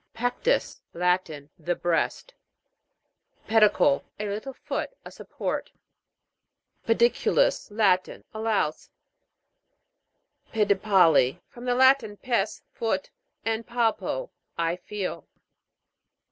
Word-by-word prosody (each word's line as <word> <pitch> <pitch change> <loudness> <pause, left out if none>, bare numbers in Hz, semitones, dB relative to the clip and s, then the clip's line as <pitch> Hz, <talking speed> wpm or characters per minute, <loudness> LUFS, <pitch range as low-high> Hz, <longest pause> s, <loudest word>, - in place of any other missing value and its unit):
PEC'TUS. 245 - 0
Latin. 170 -5 -1
The 175 +2 -1
breast. 175 - -1 1.1
PED'ICLE. 220 +6 +4 0.2
A 210 - -2
little 220 +7 -5
foot: - - -4 0.2
a - - -9
support. - - -5 1.2
PEDI'CULUS.: 240 - +2
Latin. 200 -4 +1
A 220 - -6
louse. 215 -8 -1 1.6
PEDIPAL'PI. 190 - +4
From 240 +1 -11
the 245 -1 +1
Latin, 260 -5 +4
pes, 235 -4 -1
foot, 205 -5 -2 0.3
and 225 0 -1
palpo, 240 - -1 0.3
I 165 0 0
feel. 195 +1 -5
215 Hz, 90 wpm, -26 LUFS, 180-240 Hz, 1.6 s, PED'ICLE